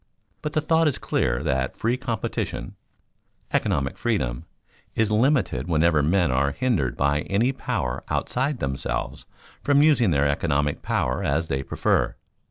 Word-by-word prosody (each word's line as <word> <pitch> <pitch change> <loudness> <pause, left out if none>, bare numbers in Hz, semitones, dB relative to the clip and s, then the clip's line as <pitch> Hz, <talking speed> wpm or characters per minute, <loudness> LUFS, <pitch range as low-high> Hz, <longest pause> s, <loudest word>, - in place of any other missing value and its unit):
But 150 - -4
the 155 - +1
thought 160 +1 +3
is 145 - 0
clear - - 0
that 65 0 -1
free 115 +2 +1
competition 120 -6 -3 0.8
economic 70 0 0
freedom 65 - -1 0.5
is 110 -1 +1
limited 110 - +2
whenever 80 -2 +3
men 85 +1 +2
are 70 +2 +1
hindered 75 - 0
by 70 +1 +2
any 115 +7 +2
power 60 - -3
outside 135 +3 -1
themselves 65 - -3 0.3
from 145 0 +4
using 140 -9 +4
their 70 -3 +2
economic 70 0 0
power 65 0 -1
as 80 +4 0
they 65 0 0
prefer. - - 0
85 Hz, 140 wpm, -24 LUFS, -, 0.8 s, from